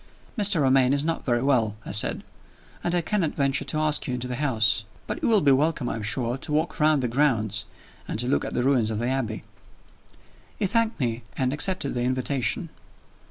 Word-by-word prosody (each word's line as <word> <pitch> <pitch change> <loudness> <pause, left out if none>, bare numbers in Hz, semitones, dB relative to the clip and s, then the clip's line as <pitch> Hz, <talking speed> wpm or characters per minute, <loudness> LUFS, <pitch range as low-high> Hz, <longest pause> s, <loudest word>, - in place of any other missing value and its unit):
"Mr. 205 - +3
Romayne 130 0 +4
is 140 +1 0
not 165 0 -1
very 120 0 +1
well," 115 -7 +2
I - - -5
said; 105 - +2 0.6
"and 175 0 0
I 175 - +2
cannot 175 -3 -1
venture 140 0 +1
to 145 - -2
ask 155 -1 +1
you 125 - -1
into 125 0 -4
the 125 -1 -4
house. 110 -7 +2 0.2
But - - -5
you - - +1
will 220 -3 +4
be 140 - +4
welcome, 145 -1 +1
I - - -3
am 115 - -5
sure, 120 +4 -1
to 150 - -6
walk 155 +3 -1
round 150 -3 +3
the - - +1
grounds, 120 -5 0 0.4
and - - -3
to 120 - -1
look 135 - +1
at - - -5
the 125 - +1
ruins 125 -5 +2
of 110 - -2
the 120 +2 -1
Abbey." 125 -5 -2 1.1
He - - 0
thanked 230 +2 0
me, 120 -3 -1 0.2
and 130 0 0
accepted 150 -1 -1
the 120 - -2
invitation. 130 - -1
135 Hz, 210 wpm, -25 LUFS, 120-155 Hz, 1.1 s, Romayne